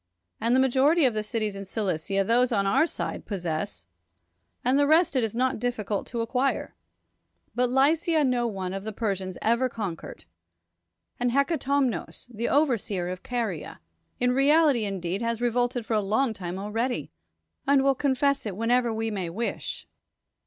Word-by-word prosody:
And 230 +3 +2
the - - +4
majority 270 +5 +4
of 250 - +3
the 215 - -1
cities 210 -1 -2
in 195 - -6
Cilicia 195 -1 -1
those 245 +4 +3
on 200 -3 +1
our 200 +12 +3
side - - -4
possess, 160 - -4 0.8
and 260 +3 +3
the 285 - +4
rest 320 0 +4
it 255 - +2
is 225 -1 -2
not 255 0 0
difficult 220 -4 -2
to 235 -2 -3
acquire. 250 +2 -1 0.8
But 245 +2 +1
Lycia 305 +5 +3
no 250 -3 +1
one 190 -4 -4
of 195 0 -4
the 220 0 -5
Persians 195 -4 -3
ever 235 +3 +2
conquered. 200 -9 -6 0.9
And 245 0 +1
llecatomnos, 275 -2 0
the 230 +3 -1
overseer 225 - +1
of 185 0 -5
Caria, 225 -10 -4 0.4
in 250 0 +2
reality 275 -2 +4
indeed 190 0 -3
has 230 -1 -1
re 240 0 +1
volted 245 0 0
for 225 - -2
a 215 - +3
long 220 +5 +1
time 180 -3 -5
already, 215 - -2 0.6
and 275 -1 +4
will 275 0 +4
confess 280 -1 +1
it 195 - -4
whenever 240 +1 +2
we 225 0 -2
may 190 -5 -3
wish. 225 +8 -4
235 Hz, 165 wpm, -26 LUFS, 200-260 Hz, 0.9 s, the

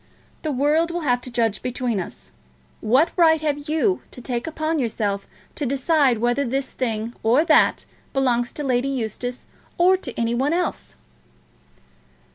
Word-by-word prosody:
The 310 - -2
world 295 +5 +2
will 345 0 -3
have 245 -5 +1
to 250 - -7
judge 230 -4 0
between 250 -3 -2
us. 180 - -8 0.5
What 265 +10 +3
right 320 -3 +5
have 295 -1 -2
you 320 +5 +1
to - - -12
take 240 +1 -3
upon 315 0 -1
yourself 210 -5 -2 0.3
to - - -4
decide 275 -1 +2
whether 240 +5 +1
this 270 +1 -2
thing 230 -2 -3
or 245 +8 +3
that - - +4 0.3
belongs 245 -3 +1
to 295 - -5
Lady 255 -1 +1
Eustace 245 -1 -4 0.3
or 365 +2 +5
to 290 -8 -5
any 230 0 +1
one 270 +6 +1
else?" 350 -1 -2
260 Hz, 155 wpm, -22 LUFS, 240-310 Hz, 0.5 s, right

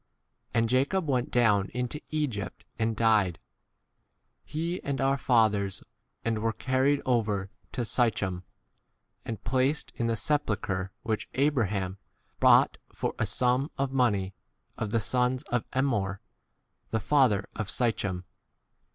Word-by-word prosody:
And 115 0 +2
Jacob 140 +9 +1
went 130 -3 +1
down 105 -5 +3
into 125 +4 -2
Egypt 140 -10 -3
and 110 0 +1
died, 105 -7 +3 1.1
he 170 +4 -3
and 140 -2 -2
our 135 +1 +3
fathers, 110 -7 +2
16 - - -22 0.3
and 115 -1 +1
were 115 +1 0
carried 135 +3 +1
over 105 -6 0 0.2
to 120 - -1
Sychem 100 -7 0 0.8
and 110 -3 -5
placed 130 +5 +1
in 115 - -1
the 115 - +1
sepulchre 105 -8 -1
which 110 -1 -2
Abraham 105 -9 +1 0.4
bought - - +5
for - - -2
a 110 - +1
sum 125 +6 +1
of 135 -1 0
money 105 -8 +1 0.4
of 115 - -3
the 115 +2 +2
sons 125 +3 +1
of 120 -2 +1
Emmor 110 -8 0 0.7
the 115 - 0
17 105 - -14
[father] 125 -9 +3
of 110 -2 -3
Sychem. 100 -7 0
115 Hz, 135 wpm, -28 LUFS, 105-130 Hz, 1.1 s, bought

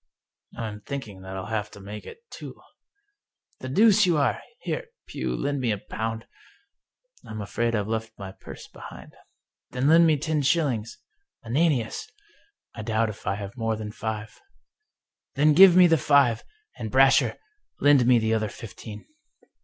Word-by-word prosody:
" - - -66
" - - -22
I'm 105 -2 -5
thinking 110 -7 -7
that 95 0 -7
I'll 95 - -5
have 105 -1 -3
to - - -13
mak 105 +2 -9
e - - -6
it 465 - -14
two." - - -9 0.5
" 410 0 -48
The 130 - -6
deuce 210 - +5
you 170 -3 +2
are! 140 - +1 0.2
Here, - - -3 0.2
Pugh, - - -4
lend 140 0 -2
me 125 -3 -1
a 105 - -1
pound." 110 +3 -5 0.5
" - - -31
I'm 110 - -7
afraid 115 +3 -1
I've 105 -1 -1
left 110 0 -4
my 95 -1 -7
purse - - -11
behind." - - -12 0.3
" - - -66
Then 125 +2 0
lend 165 +2 +6
me 155 -2 +3
ten 150 +1 -1
shillings 135 -7 0 0.2
— 400 - -36
^Ananias! 140 - 0 0.2
" 410 - -33
" - - -63
I 110 - -7
doubt 110 0 0
if 105 - -10
I 100 - +1
have 100 +1 -7
more 115 -2 -1
than 105 -1 -6
five." 110 0 -6 0.5
" - - -61
Then 150 +2 +4
give 185 +2 +8
me 180 0 +8
the 165 -3 +4
five. 130 -4 +3 0.4
And, - - -4
Brasher, - - +4 0.4
lend 140 -4 +5
me 125 -1 +6
the 110 0 +1
other 110 -1 0
fifteen." 105 0 -10
115 Hz, 190 wpm, -25 LUFS, 110-150 Hz, 0.5 s, give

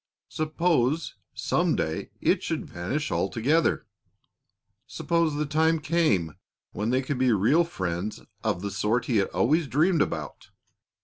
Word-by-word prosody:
Suppose 155 -2 0 0.2
some - - +1
day - - -2
it - - +2
should - - -3
vanish 130 - -3
altogether! 145 +8 +1 1.0
Suppose 170 -3 0
the 150 +1 -1
time 160 +2 +2
came 150 - +1 0.4
when 105 +2 -2
they 130 +2 +1
could 130 0 -3
be 130 -1 +3
real 115 - +4
friends 95 - -4 0.2
of 90 - -1
the 100 - -3
sort 105 +5 0
he 120 - +1
had 100 - +2
always 145 - +1
dreamed 160 +5 +2
about! - - -3
140 Hz, 135 wpm, -26 LUFS, 105-160 Hz, 1.0 s, real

